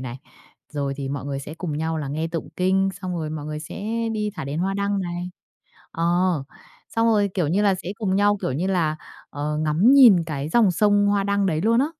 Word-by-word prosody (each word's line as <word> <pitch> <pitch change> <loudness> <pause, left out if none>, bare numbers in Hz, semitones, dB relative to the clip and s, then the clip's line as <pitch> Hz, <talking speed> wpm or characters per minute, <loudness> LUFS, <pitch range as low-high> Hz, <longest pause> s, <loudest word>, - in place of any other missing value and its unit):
này, 130 0 -6 0.5
rồi 140 -2 -2
thì 140 -1 -4
mọi 140 -1 -4
người 140 -1 -3
sẽ 150 +3 -8
cùng 160 -3 -4
nhau 160 0 -1
là 145 - -4
nghe 155 +4 -2
tụng 165 -1 -5
kinh, 190 +1 +2
xong 185 -1 -4
rồi 155 -2 -3
mọi 150 -1 -5
người 150 0 -4
sẽ 200 +6 -7 0.3
đi 210 -1 -2
thả - - -4
đèn 140 +3 -4
hoa 195 +3 0
đăng 200 0 0
này 175 0 -4 0.6
ờ, 165 - -3 0.9
xong 225 0 +3
rồi, 205 -3 +3
kiểu 175 -6 0
như 195 +6 +1
là, 200 -2 +3
sẽ 180 - -7
cùng 195 -4 0
nhau, 205 +1 +3
kiểu - - -1
như 160 +8 -1
là, 165 -5 0 0.3
ờ, 150 +1 -3
ngắm 155 - +3
nhìn 225 -12 +7
cái 145 -2 -4
dòng 215 +1 +4
sông 205 +2 +3
hoa 200 -1 +2
đăng 200 -1 +1
đấy 160 -3 0
luôn 230 +4 +3
á. 275 - +2
175 Hz, 230 wpm, -23 LUFS, 150-200 Hz, 0.9 s, nhìn